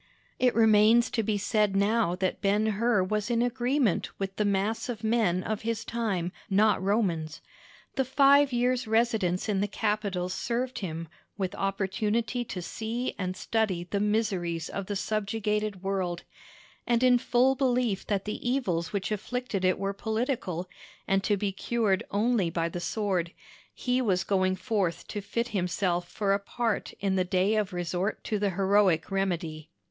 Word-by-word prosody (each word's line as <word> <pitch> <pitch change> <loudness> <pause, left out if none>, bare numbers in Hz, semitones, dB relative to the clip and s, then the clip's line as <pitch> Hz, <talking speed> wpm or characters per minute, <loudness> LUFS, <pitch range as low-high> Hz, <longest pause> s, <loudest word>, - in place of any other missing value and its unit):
It 250 -1 +3
remains 220 +1 +5
to 230 - +1
be 215 -1 0
said 210 -1 +1
now 200 -2 +2
that 185 0 -2
Ben 205 +2 +2
Hur 220 -1 +2
was 210 +3 -1
in 235 0 +2
agreement 245 - +1
with 195 -1 -4
the 210 - 0
mass 205 +5 0
of 225 -2 -5
men 220 -5 +2
of 215 -1 -3
his 230 -1 -2
time 200 -7 -1 0.2
not 210 +1 +3
Romans. 185 -6 0 0.5
The 265 - +1
five 275 +2 +5
years' 250 0 +1
residence 220 -5 +1
in 200 -2 +1
the 205 - +1
capital 205 -3 -1
served 240 +7 -2
him 165 -3 -5 0.3
with 190 -3 -2
opportunity 210 +5 -1
to 185 -6 -5
see 230 +7 -3
and 185 -1 -3
study 205 -6 0
the 200 - +1
miseries 195 -6 0
of 195 -1 -5
the 205 - -2
subjugated 210 -1 -1
world; 185 -3 -2 0.6
and 240 0 +2
in 250 -1 +5
full 255 +1 +3
belief 250 -6 0
that 200 -2 -1
the 215 +3 -3
evils 185 -11 0
which 200 0 -2
afflicted 215 -1 -3
it 185 0 +3
were 195 0 -2
political, 220 - -2 0.4
and 195 0 +2
to 205 - +2
be 200 0 -1
cured 205 -1 0
only 210 -3 +1
by 165 0 -1
the 175 - -5
sword, 185 -3 -1 0.4
he 250 +1 0
was 190 -6 +1
going 185 -1 +1
forth 190 -4 -1
to 205 - -4
fit 235 +4 -2
himself 180 -2 -1
for 200 -2 0
a 200 - +1
part 225 +2 -2
in 195 -1 +1
the 185 - +3
day 185 +3 +1
of 210 -2 0
resort 180 +3 -2
to 215 - -1
the 205 0 +1
heroic 195 -2 +2
remedy. 170 -5 -2
205 Hz, 165 wpm, -28 LUFS, 185-230 Hz, 0.6 s, remains